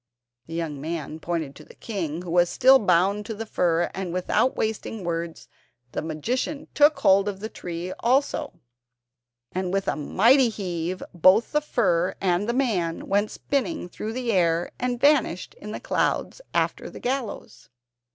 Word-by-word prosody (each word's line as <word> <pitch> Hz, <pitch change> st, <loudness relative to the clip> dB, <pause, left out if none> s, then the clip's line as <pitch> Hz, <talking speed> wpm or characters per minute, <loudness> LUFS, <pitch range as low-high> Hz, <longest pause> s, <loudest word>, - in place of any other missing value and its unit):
The 165 Hz, -, -7 dB
young 155 Hz, -4 st, -3 dB
man 155 Hz, -1 st, -4 dB
pointed 160 Hz, -4 st, -3 dB
to 155 Hz, -, -12 dB
the -, -, -17 dB
king, 175 Hz, -6 st, -4 dB
who 175 Hz, -, -6 dB
was 175 Hz, 0 st, +4 dB
still 265 Hz, +1 st, +6 dB
bound 195 Hz, +1 st, +2 dB
to 225 Hz, -, -4 dB
the 225 Hz, +2 st, -5 dB
fir; 175 Hz, -5 st, +1 dB
and 190 Hz, -2 st, -4 dB
without 185 Hz, +8 st, +1 dB
wasting 220 Hz, -1 st, -3 dB
words 170 Hz, -1 st, -4 dB, 0.4 s
the -, -, -3 dB
magician 245 Hz, -, -3 dB
took 295 Hz, +1 st, +4 dB
hold 195 Hz, +1 st, +5 dB
of 195 Hz, -2 st, -6 dB
the 220 Hz, +2 st, -5 dB
tree 175 Hz, -1 st, -6 dB
also, 280 Hz, +3 st, +1 dB, 1.0 s
and 185 Hz, 0 st, -2 dB
with 195 Hz, 0 st, -1 dB
a -, -, +1 dB
mighty 235 Hz, -, +4 dB
heave 185 Hz, -4 st, -4 dB
both 195 Hz, -, +4 dB
fir 180 Hz, -, +1 dB
and 190 Hz, +4 st, +1 dB
man 210 Hz, -11 st, -1 dB
went 205 Hz, +2 st, +2 dB
spinning 285 Hz, -, -2 dB
through 215 Hz, +5 st, -5 dB
the 245 Hz, -1 st, -1 dB
air, 170 Hz, -3 st, +2 dB
and 245 Hz, -1 st, -1 dB
vanished 270 Hz, -, +2 dB
in 210 Hz, -, -9 dB
the -, -, -5 dB
clouds -, -, -1 dB
after -, -, -1 dB
the -, -, -10 dB
gallows. 255 Hz, -2 st, -4 dB
190 Hz, 160 wpm, -25 LUFS, 170-235 Hz, 1.0 s, still